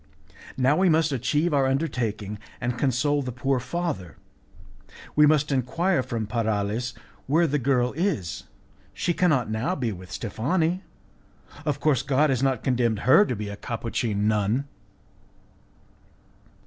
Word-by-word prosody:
Now 135 Hz, +3 st, +3 dB
we 190 Hz, -1 st, +4 dB
must 160 Hz, -1 st, +3 dB
achieve 145 Hz, +6 st, 0 dB
our 135 Hz, -2 st, +3 dB
undertaking, 115 Hz, -8 st, -2 dB, 0.2 s
and 120 Hz, 0 st, -2 dB
console 145 Hz, +3 st, +1 dB
the 125 Hz, -2 st, -4 dB
poor 130 Hz, +2 st, 0 dB
father. 140 Hz, -, -4 dB, 1.0 s
We 150 Hz, 0 st, +6 dB
must 150 Hz, -1 st, +2 dB
enquire 140 Hz, +6 st, +1 dB
from 120 Hz, -3 st, -3 dB
Paralis 110 Hz, +1 st, -1 dB, 0.3 s
where 160 Hz, +5 st, +3 dB
the 150 Hz, -2 st, 0 dB
girl 125 Hz, -1 st, +1 dB
is. 155 Hz, -, -2 dB, 0.5 s
She 175 Hz, -, 0 dB
cannot 150 Hz, -11 st, +2 dB
now 115 Hz, +12 st, -1 dB
be 120 Hz, -7 st, -1 dB
with 90 Hz, -1 st, -9 dB
Steffani. 160 Hz, -, -1 dB, 0.9 s
Of -, -, 0 dB
course, 145 Hz, -5 st, +2 dB
God 140 Hz, +2 st, +2 dB
has 130 Hz, -2 st, 0 dB
not 135 Hz, -4 st, +1 dB
condemned 120 Hz, -5 st, +1 dB
her 135 Hz, +11 st, +6 dB
to 125 Hz, -, -1 dB
become 105 Hz, -1 st, -5 dB
a -, -, -9 dB
Capuchin 110 Hz, -3 st, -2 dB
nun." 110 Hz, +5 st, +1 dB
130 Hz, 135 wpm, -25 LUFS, 115-150 Hz, 1.0 s, We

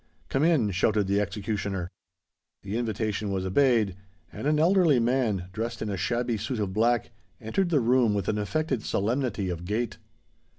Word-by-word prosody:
"Come 135 Hz, -, +1 dB
in!" 150 Hz, -11 st, +3 dB
shouted 105 Hz, +2 st, +2 dB
the 100 Hz, +1 st, +1 dB
executioner. 100 Hz, -2 st, -3 dB, 0.7 s
The 100 Hz, +2 st, -4 dB
invitation 110 Hz, -3 st, -2 dB
was 95 Hz, -1 st, -2 dB
obeyed; 110 Hz, -2 st, +3 dB, 0.4 s
and -, -, -4 dB
an 150 Hz, 0 st, +3 dB
elderly 165 Hz, -4 st, +4 dB
man, 115 Hz, -7 st, 0 dB
dressed 115 Hz, +3 st, -3 dB
in 105 Hz, -, -3 dB
a -, -, -1 dB
shabby 120 Hz, +3 st, -1 dB
suit 110 Hz, +4 st, -3 dB
of 100 Hz, -3 st, -2 dB
black, 115 Hz, +2 st, +1 dB, 0.3 s
entered 175 Hz, -, -1 dB
the 155 Hz, -4 st, +3 dB
room 120 Hz, -3 st, +3 dB
with 100 Hz, -2 st, -2 dB
an 105 Hz, -, 0 dB
affected 135 Hz, +3 st, -1 dB
solemnity 115 Hz, -1 st, -1 dB
of 85 Hz, 0 st, -5 dB
gait. 105 Hz, +5 st, -2 dB
110 Hz, 165 wpm, -27 LUFS, 100-125 Hz, 0.7 s, elderly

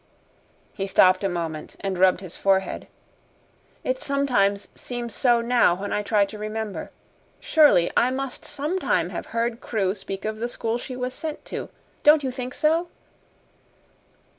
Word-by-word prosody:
He 195 Hz, -1 st, -3 dB
stopped 185 Hz, 0 st, +5 dB
a 195 Hz, -, +1 dB
moment 165 Hz, -3 st, -4 dB
and 195 Hz, -1 st, -2 dB
rubbed 185 Hz, 0 st, +4 dB
his 185 Hz, -3 st, -8 dB
forehead. 195 Hz, -1 st, 0 dB, 1.0 s
"It -, -, -1 dB
sometimes 245 Hz, -8 st, +1 dB
seems 240 Hz, -2 st, -5 dB
so 240 Hz, -1 st, +3 dB
now 235 Hz, -7 st, +3 dB
when 200 Hz, +3 st, -4 dB
I 210 Hz, -, +1 dB
try 205 Hz, -1 st, +2 dB
to 210 Hz, +1 st, -9 dB
remember. 215 Hz, 0 st, -4 dB, 0.5 s
Surely 295 Hz, -, +4 dB
I 245 Hz, -, +4 dB
must 265 Hz, 0 st, -4 dB
sometime 300 Hz, +6 st, -1 dB
have -, -, -5 dB
heard 230 Hz, +1 st, -2 dB
Crewe 195 Hz, -5 st, 0 dB
speak 195 Hz, 0 st, -6 dB
of 215 Hz, 0 st, -2 dB
the 235 Hz, +2 st, -3 dB
school 230 Hz, 0 st, -2 dB
she 255 Hz, -, -7 dB
was 250 Hz, 0 st, -3 dB
sent 310 Hz, +2 st, -5 dB
to. -, -, -4 dB, 0.3 s
Don't 300 Hz, 0 st, +6 dB
you 260 Hz, -, -1 dB
think 250 Hz, 0 st, -6 dB
so?" 325 Hz, +3 st, +2 dB
230 Hz, 155 wpm, -24 LUFS, 195-260 Hz, 1.0 s, Don't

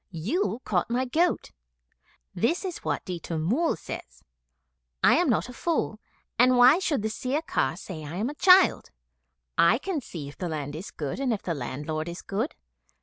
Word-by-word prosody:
'You 225 Hz, -, -1 dB
caught 185 Hz, 0 st, 0 dB
my 250 Hz, +2 st, 0 dB
goat. 330 Hz, +8 st, +1 dB, 0.8 s
This 325 Hz, -, 0 dB
is 360 Hz, -2 st, -4 dB
what -, -, -3 dB
Ditta 175 Hz, -3 st, -4 dB
Mull 235 Hz, -, +1 dB
says -, -, -9 dB, 0.8 s
'I -, -, +7 dB
am -, -, +2 dB
not 165 Hz, -, +1 dB
a 250 Hz, -, -9 dB
fool, 275 Hz, -7 st, -1 dB, 0.4 s
and 250 Hz, +1 st, +6 dB
why 255 Hz, +7 st, +7 dB
should 295 Hz, -, 0 dB
the -, -, +1 dB
Sirkar 255 Hz, -, -1 dB
say 175 Hz, -5 st, -7 dB
I 150 Hz, +3 st, -7 dB
am 210 Hz, +6 st, -1 dB
a 290 Hz, -, -4 dB
child? 370 Hz, +4 st, +5 dB, 0.7 s
I 190 Hz, +7 st, +6 dB
can 330 Hz, +1 st, -3 dB
see 160 Hz, -, -7 dB
if 145 Hz, -, -12 dB
the 180 Hz, -, -2 dB
land 145 Hz, -2 st, -4 dB
is 175 Hz, +6 st, -7 dB
good 145 Hz, -, -5 dB
and 270 Hz, -3 st, 0 dB
if 215 Hz, -, -2 dB
the 170 Hz, -, -1 dB
landlord 150 Hz, +4 st, -4 dB
is 170 Hz, +1 st, -8 dB
good. 220 Hz, +9 st, -2 dB
215 Hz, 180 wpm, -27 LUFS, -, 0.8 s, I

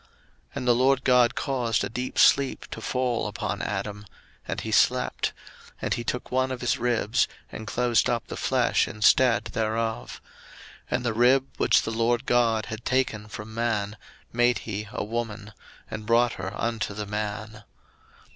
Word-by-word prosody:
01:002:021 -, -, -30 dB, 0.5 s
And 125 Hz, -, -3 dB
the 120 Hz, -, +6 dB
LORD 130 Hz, +2 st, +3 dB
God 125 Hz, -1 st, +4 dB
caused 125 Hz, -5 st, 0 dB
a -, -, -1 dB
deep 125 Hz, +4 st, -4 dB
sleep 140 Hz, -1 st, +4 dB
to -, -, -6 dB
fall 125 Hz, -3 st, -1 dB
upon 105 Hz, -1 st, -3 dB
Adam, 105 Hz, 0 st, -4 dB, 0.4 s
and -, -, -2 dB
he -, -, -5 dB
slept: -, -, +2 dB, 0.5 s
and -, -, -1 dB
he 120 Hz, -, -3 dB
took 125 Hz, +1 st, -4 dB
one 130 Hz, +1 st, +1 dB
of 130 Hz, -, -4 dB
his 120 Hz, -1 st, 0 dB
ribs, 120 Hz, -2 st, +1 dB, 0.2 s
and 110 Hz, -, -7 dB
closed 120 Hz, 0 st, +2 dB
up 120 Hz, -1 st, -1 dB
the -, -, -7 dB
flesh -, -, +2 dB
instead 115 Hz, +3 st, +3 dB
thereof; 110 Hz, 0 st, -2 dB, 0.7 s
01:002:022 -, -, 0 dB
And 125 Hz, -, -7 dB
the 115 Hz, -, +1 dB
rib, 125 Hz, +4 st, +4 dB
which -, -, +4 dB
the -, -, -3 dB
LORD 115 Hz, +3 st, +1 dB
God 115 Hz, -3 st, +2 dB
had 110 Hz, +1 st, -7 dB
taken 125 Hz, -5 st, 0 dB
from 110 Hz, +1 st, -8 dB
man, 110 Hz, -3 st, -1 dB, 0.4 s
made 120 Hz, +1 st, +3 dB
he 105 Hz, -1 st, -4 dB
a -, -, -3 dB
woman, 110 Hz, -1 st, -4 dB, 0.4 s
and 110 Hz, 0 st, -6 dB
brought 115 Hz, +1 st, +4 dB
her 95 Hz, +1 st, -5 dB
unto 110 Hz, -3 st, -2 dB
the 105 Hz, 0 st, -4 dB
man. 105 Hz, +1 st, -5 dB
115 Hz, 170 wpm, -26 LUFS, 110-125 Hz, 0.7 s, the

